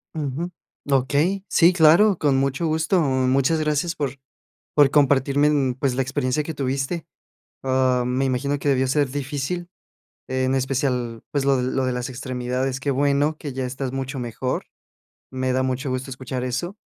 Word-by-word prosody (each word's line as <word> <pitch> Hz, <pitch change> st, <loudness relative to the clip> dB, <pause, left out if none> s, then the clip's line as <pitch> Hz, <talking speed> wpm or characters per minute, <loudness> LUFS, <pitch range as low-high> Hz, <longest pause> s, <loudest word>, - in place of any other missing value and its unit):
Ujú, 155 Hz, +4 st, -3 dB, 0.4 s
okey. 145 Hz, +9 st, +2 dB
Sí, 175 Hz, +2 st, +5 dB
claro, 175 Hz, +4 st, +5 dB
con 140 Hz, -3 st, +2 dB
mucho 135 Hz, +4 st, 0 dB
gusto. 160 Hz, +4 st, +1 dB
Muchas 135 Hz, +2 st, +2 dB
gracias 155 Hz, +3 st, 0 dB
por, 145 Hz, -4 st, -2 dB, 0.6 s
por 145 Hz, -2 st, +6 dB
compartirme, 140 Hz, 0 st, +3 dB
mm, 135 Hz, -4 st, +1 dB
pues, 130 Hz, -1 st, -1 dB
la 135 Hz, -, +1 dB
experiencia 135 Hz, +2 st, -1 dB
que 160 Hz, -, -5 dB
tuviste. 135 Hz, +4 st, -2 dB, 0.6 s
Ah, 130 Hz, -1 st, +2 dB
me 130 Hz, +2 st, 0 dB
imagino 140 Hz, +2 st, -1 dB
que 145 Hz, -, 0 dB
debió 130 Hz, -1 st, +2 dB
ser 140 Hz, 0 st, +1 dB
difícil, 145 Hz, +5 st, -3 dB, 0.6 s
en 130 Hz, 0 st, 0 dB
especial, 125 Hz, -3 st, -1 dB
pues, 140 Hz, -2 st, 0 dB
lo 135 Hz, -1 st, +3 dB
de 125 Hz, -, -1 dB
lo 135 Hz, -1 st, 0 dB
de 130 Hz, -, 0 dB
las 125 Hz, +1 st, -3 dB
extremidades. 130 Hz, 0 st, -3 dB
Qué 140 Hz, -, -2 dB
bueno 145 Hz, +3 st, +1 dB
que 145 Hz, -3 st, -6 dB
ya 130 Hz, 0 st, -3 dB
estás 130 Hz, +1 st, -4 dB
mucho 135 Hz, +1 st, -4 dB
mejor. 125 Hz, +1 st, -3 dB, 0.7 s
Me 130 Hz, 0 st, -1 dB
da 130 Hz, -, +2 dB
mucho 130 Hz, +1 st, -2 dB
gusto 130 Hz, +1 st, -3 dB
escuchar 130 Hz, 0 st, -5 dB
eso. 150 Hz, -, -3 dB
135 Hz, 165 wpm, -23 LUFS, 130-145 Hz, 0.7 s, por